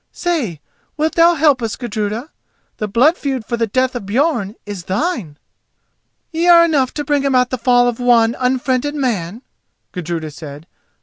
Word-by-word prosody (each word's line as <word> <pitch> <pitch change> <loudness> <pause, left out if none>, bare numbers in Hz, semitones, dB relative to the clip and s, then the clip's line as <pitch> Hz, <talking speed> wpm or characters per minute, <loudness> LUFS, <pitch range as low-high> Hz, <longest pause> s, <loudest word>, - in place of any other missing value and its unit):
Say, 285 - -2 0.4
wilt 310 +1 0
thou 340 +1 +5
help 290 -4 +3
us, 225 -2 -2
Gudruda? 225 +3 -4 0.5
The 210 - -3
blood 255 - +3
feud 265 -5 -3
for 235 - -2
the 230 -1 -1
death 255 +4 0
of 245 - -4
Björn 220 0 -1
is 200 -4 -7
thine." 195 - -2 0.9
"Ye 335 +1 0
are 340 -1 +8
enough 280 -6 +1
to 295 - -2
bring 285 -1 +1
about 255 -2 +2
the 255 - -2
fall 245 0 +3
of 240 -1 -2
one 235 -1 +3
unfriended 260 +2 0
man," 230 - -2 0.5
Gudruda 165 -3 -4
said. 150 0 -10
245 Hz, 165 wpm, -17 LUFS, 210-290 Hz, 0.9 s, are